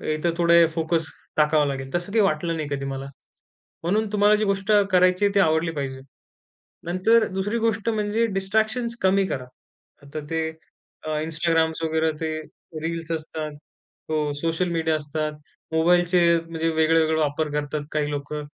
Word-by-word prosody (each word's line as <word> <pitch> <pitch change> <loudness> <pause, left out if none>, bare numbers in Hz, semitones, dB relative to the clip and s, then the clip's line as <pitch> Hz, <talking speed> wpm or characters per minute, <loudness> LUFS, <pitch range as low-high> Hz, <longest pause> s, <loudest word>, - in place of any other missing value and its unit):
इथं 170 +2 0
थोडे 170 0 +6
फोकस 165 0 0 0.3
टाकावा 150 0 +4
लागेल. 135 -1 -3
तसं 175 +3 -1
काही 225 - +4
वाटलं 165 0 0
नाही 155 - -3
कधी 140 0 -5
मला. 135 0 -4 0.8
म्हणून 210 +6 +1
तुम्हाला 210 0 +5
जी 215 - 0
गोष्ट 200 +1 0 0.2
करायची 185 +2 +4
ती 200 - +5
आवडली 160 -1 +2
पाहिजे. 135 -3 -4 0.9
नंतर 205 +6 +3
2री 195 +4 -2
गोष्ट 225 -1 0
म्हणजे 215 +1 +1
डिस्ट्रॅक्शन्स 220 +4 0
कमी 190 +1 +3
करा. 130 -7 -4 0.6
आता 145 +2 -7
ते 160 -1 -1 0.6
अ, - - -2
Instagram 165 0 +1
वगैरे 160 0 +1
ते 160 - -1 0.5
रील्स 165 0 -3
असतात. 155 -1 -4 0.6
हो 155 - 0 0.2
सोशल 165 +2 0
मीडिया 160 -1 0
असतात. 150 +1 -3 0.4
मोबाईलचे 175 +2 +3 0.3
म्हणजे 165 0 -1
वेगळे-वेगळे 160 0 +3
वापर 150 0 0
करतात 150 0 -2
काही 150 -1 0
लोकं. 145 +1 -4
165 Hz, 145 wpm, -24 LUFS, 155-190 Hz, 0.9 s, थोडे